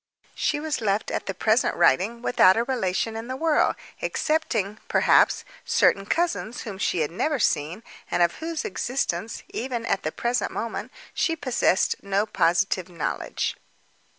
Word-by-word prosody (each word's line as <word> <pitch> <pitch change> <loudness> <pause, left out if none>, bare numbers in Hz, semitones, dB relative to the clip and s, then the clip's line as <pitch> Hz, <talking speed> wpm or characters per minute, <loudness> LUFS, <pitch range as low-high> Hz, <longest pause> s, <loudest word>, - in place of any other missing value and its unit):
She 295 - 0
was 305 -3 -2
left, 205 0 0
at - - -3
the 195 - -3
present 220 +5 +2
writing, 215 - +2
without 190 -6 +5
a 230 - +2
relation 225 -3 -1
in 225 +1 -5
the 260 - -3
world—excepting, 295 -6 0
perhaps, - - +4 0.2
certain 195 0 +2
cousins 330 -9 -1
whom 200 -4 -7
she 175 - 0
had 150 - -1
never 295 - 0
seen, 170 - 0 0.3
and 175 - +2
of 170 - +1
whose 325 +2 -4
existence 235 - -2
even, 240 -2 -3
at 195 - 0
the 155 - -2
present 240 +6 -1
moment, 230 - -4 0.2
she 330 - +1
possessed 255 - +1
no 200 +1 0
positive 185 -1 +1
knowledge. 170 -3 -3
225 Hz, 150 wpm, -25 LUFS, 190-260 Hz, 0.3 s, without